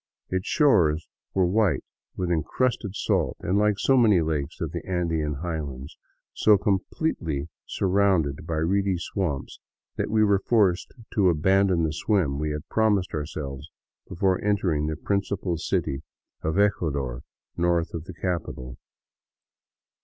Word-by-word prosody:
Its 95 0 -1
shores 85 - +3 0.3
were 95 -1 +4
white 100 0 +2 0.3
with 90 -1 -2
encrusted 100 +4 0
salt - - 0
and, 95 +3 +1
like 105 -1 +2
so 135 - +3
many 110 -7 +5
lakes 80 -2 -2
of 80 -2 -3
the 85 -1 -5
Andean 80 -5 -1
high 85 -2 -2
lands, 70 -1 -7 0.4
so 105 -1 +5
completely 90 - -1 0.2
surrounded 95 -7 +1
by 80 - -2
reedy 95 +4 +1
swamps 85 -4 -3 0.4
that - - -1
we 110 0 +3
were 100 -2 +4
forced 100 -5 +2 0.2
to 100 -4 +4
abandon 95 +2 +3
the 80 -1 0
swim 80 -6 0
we 75 0 -1
had 75 0 -5
promised 105 -4 +1
ourselves 75 -1 -5 0.4
before 95 +1 +1
entering 90 -7 +1
the 80 - -2
principal 100 0 -1
city 80 -4 -1 0.4
of 80 +3 -1
Ecuador 70 -11 0 0.3
north 85 -1 +1
of 80 -1 -5
the 95 - -8
capital. 80 -9 -4
85 Hz, 140 wpm, -25 LUFS, 75-100 Hz, 0.4 s, many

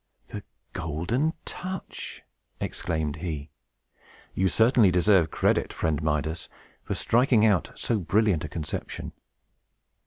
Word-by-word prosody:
"The - - -6 0.3
Golden 100 - -1
Touch!" 185 0 -6 0.4
exclaimed 80 -2 -2
he. 80 -3 -5 0.8
"You 95 - +2
certainly 110 +1 +5
deserve 90 -1 +4
credit, - - +1
friend 80 -3 -1
Midas, 80 +2 -1 0.3
for - - -3
striking 120 -2 +3
out 100 -6 +3
so 115 -3 -1
brilliant 100 -1 +2
a 80 - -4
conception. 75 0 -5
90 Hz, 105 wpm, -27 LUFS, 80-110 Hz, 0.8 s, certainly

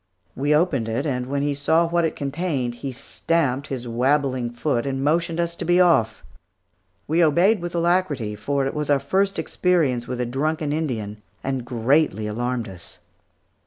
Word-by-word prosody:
We 145 +3 +2
opened 150 -9 +1
it, 120 +6 -1
and 125 -4 -2
when 140 +1 -1
he 145 0 +1
saw 160 +4 +2
what 170 0 +1
it 160 - -2
contained 140 -4 -2
he 135 - -3
stamped 140 +1 -1
his 125 -3 -5
wabbling 130 +1 +1
foot 120 +1 -1
and 135 0 -2
motioned 165 +3 +1
us 170 0 0
to - - -4
be 175 +1 +3
off. 115 -12 +3 0.8
We 165 +3 +3
obeyed 175 +6 +3
with 175 0 -5
alacrity, 170 - 0
for 135 +6 -1
it 135 - -2
was 150 -1 -3
our 145 - +5
first 190 +9 0
experience 150 -10 +1
with 125 - -4
a 125 - 0
drunken 150 +4 -1
Indian, 110 -9 -3 0.2
and 135 -2 -2
greatly 120 -1 +1
alarmed 120 +2 -2
us. 90 -3 -12
140 Hz, 170 wpm, -23 LUFS, 125-165 Hz, 0.8 s, our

